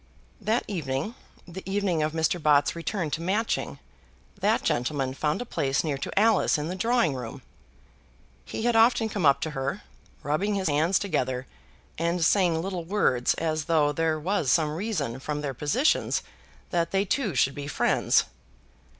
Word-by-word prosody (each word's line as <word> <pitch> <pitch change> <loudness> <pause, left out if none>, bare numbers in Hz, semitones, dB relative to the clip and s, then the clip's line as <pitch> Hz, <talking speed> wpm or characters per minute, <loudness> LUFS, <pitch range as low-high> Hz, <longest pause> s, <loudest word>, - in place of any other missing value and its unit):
That 220 +4 +1
evening, 155 - -3 0.3
the 180 +2 -8
evening 190 -5 0
of 155 0 0
Mr. 160 +2 0
Bott's 145 0 +3
return 170 -1 -3
to 160 - -2
Matching, 205 +6 -1 0.6
that - - +2
gentleman 130 +1 -1
found 150 - -1
a - - -15
place 140 - 0
near 145 -4 -2
to 190 - -1
Alice 220 -5 +3
in 150 +2 -3
the 180 - -3
drawing 230 - +2
room. 125 +1 -7 1.0
He 220 - -5
had 240 -1 +2
often 225 0 +4
come 200 -7 +1
up 140 0 +4
to 160 - -2
her, 140 +7 -3 0.4
rubbing 190 +9 0
his 190 -2 -1
hands 160 +6 +2
together, 130 -10 -1 0.5
and 170 0 +1
saying 170 -4 +3
little 185 -2 -3
words, 165 -9 +1
as 155 -2 -2
though 155 -3 +3
there 160 +1 0
was 165 -4 0
some 155 -1 +2
reason 175 - -3
from 150 +2 -3
their 140 -2 -3
positions 210 - +1 0.5
that 170 -2 +1
they 195 +1 +1
two 205 - -1
should 130 +2 +3
be 145 0 -6
friends. - - +2
165 Hz, 165 wpm, -26 LUFS, 145-195 Hz, 1.0 s, often